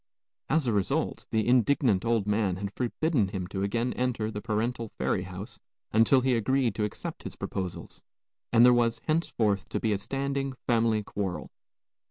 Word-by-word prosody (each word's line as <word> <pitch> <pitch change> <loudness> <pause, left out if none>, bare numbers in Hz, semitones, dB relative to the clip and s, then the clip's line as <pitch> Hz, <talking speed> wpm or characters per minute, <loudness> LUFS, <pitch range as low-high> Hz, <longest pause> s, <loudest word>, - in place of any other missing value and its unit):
As 155 -3 +2
a 120 - +1
result, 100 -2 -1
the 110 0 0
indignant 125 -4 +3
old 115 -3 +1
man 105 -3 +1
had 100 +2 -5
forbidden 125 - 0
him 95 -2 -4
to 95 - -3
again 115 +5 0
enter 120 -4 -1
the 105 -1 -5
parental 115 +1 -2
ferry 90 - 0
house 95 +3 -8 0.3
until 115 +4 +5
he 130 -1 +2
agreed 120 +1 +1
to 105 - -2
accept 105 - -4
his - - -7
proposals, 95 -3 -5 0.5
and 120 +1 +7
there 125 - +7
was 120 -1 +2
henceforth 110 - 0
to - - -2
be 110 -2 +1
a 100 - -1
standing 135 +3 -2
family 115 -2 +2
quarrel. 95 -3 -4
115 Hz, 170 wpm, -28 LUFS, 100-125 Hz, 0.5 s, and